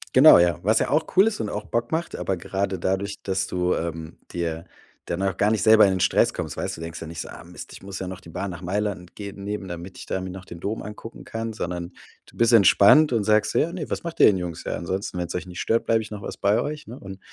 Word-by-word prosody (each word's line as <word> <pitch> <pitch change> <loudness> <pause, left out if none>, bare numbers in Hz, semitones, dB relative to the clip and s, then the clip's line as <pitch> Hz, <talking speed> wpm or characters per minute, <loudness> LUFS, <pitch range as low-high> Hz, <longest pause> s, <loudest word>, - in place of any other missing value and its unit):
Genau, 135 - +9
ja. 85 0 +3
Was 110 +3 +3
ja - - -1
auch 155 - +2
cool 195 - +7
ist 225 - -1
und 105 - -3
auch 105 0 -4
Bock 115 +5 -2
macht, 165 +2 -2
aber 95 - -2
gerade 95 +1 -2
dadurch, 100 +3 -2
dass 95 -1 -1
du, 90 0 0
ähm, 80 -1 -5
dir 85 -1 -3 0.4
dann 85 +2 -2
auch 95 -3 0
gar 105 +1 +2
nicht 110 -2 +1
selber 110 0 +7
in 95 - +5
den 95 - -1
Stress - - +3
kommst, - - -4
weißt - - -3
du? - - -11
Du - - -4
denkst 85 0 -8
ja 80 - -5
nicht 80 0 -8
so: - - -4
„Ah - - -10
Mist, - - -10
ich - - -12
muss 95 -1 -6
ja 95 - -4
noch 95 0 -7
die 85 - -14
Bahn 95 +4 -4
nach 85 0 -7
Mailand 95 -1 -3
geben 100 -1 -7
nehmen, 105 -1 -4
damit 85 +2 -8
ich - - -9
da 95 - -2
mir 95 - -5
noch 95 +1 -9
den 85 -1 -10
Dom 110 +3 -3
angucken 105 +2 -9
kann.“ 115 0 -4
Sondern 90 -4 -4 0.4
du - - -18
bist 115 0 +3
entspannt 115 - +7
und 110 -4 +1
sagst 110 0 +3
so: - - +2
„Ja, 170 +3 0
ne, 165 -5 -5
was - - -3
macht 170 -1 -3
ihr - - +9
denn, 95 - +4
Jungs? 90 -2 -5
Ja, - - -3
ansonsten, 90 +2 -4
wenn's 85 0 -3
euch 90 - -4
nicht 90 +1 -8
stört, 115 +1 +1
bleibe 115 0 +2
ich 110 0 -9
noch 105 -1 -6
was - - -6
bei 100 +2 +2
euch." 150 -3 -5
Ne, 120 +4 -8
und, 95 0 -10
100 Hz, 285 wpm, -24 LUFS, 90-110 Hz, 0.4 s, Genau